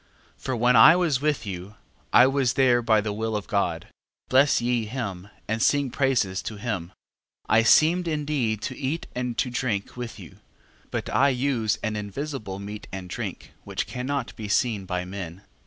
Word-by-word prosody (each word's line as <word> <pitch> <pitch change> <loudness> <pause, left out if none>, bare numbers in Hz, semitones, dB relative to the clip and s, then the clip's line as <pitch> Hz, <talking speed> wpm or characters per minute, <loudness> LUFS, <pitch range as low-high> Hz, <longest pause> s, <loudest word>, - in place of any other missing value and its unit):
12:18. - - -26
For 130 - -2
when 120 +2 +3
I 135 +9 +9
was 165 -7 +1
with 150 -5 0
you, 95 +1 -7 0.4
I 125 - +7
was 135 -2 +2
there 125 -2 +4
by 110 -2 +3
the 105 0 -3
will 110 +1 -2
of 105 - -3
God: 85 -5 -1 0.4
bless 135 +2 +4
ye 120 -2 0
him, 100 -6 -5 0.2
and 110 +1 -1
sing 140 0 +2
praises 120 -9 +1
to 110 - -6
him. 100 -5 -3 0.6
12:19. 110 - +3
I - - +5
seemed 165 +9 +4
indeed 145 -9 -1
to 130 - -3
eat 145 +5 -3
and 125 -1 -3
to 125 - 0
drink 120 -5 -2
with 120 -2 -6
you 90 -6 -12 0.5
but - - -3
I 140 +2 +4
use 125 -5 0
an 110 -1 -1
invisible 105 0 -5
meat 105 +1 -8
and 95 -1 -7
drink, - - -6
which - - -3
cannot 135 +3 -4
be 110 -3 -6
seen 105 -1 +1
by 90 -1 -2
men. 90 -1 -7
115 Hz, 185 wpm, -25 LUFS, 100-135 Hz, 0.6 s, I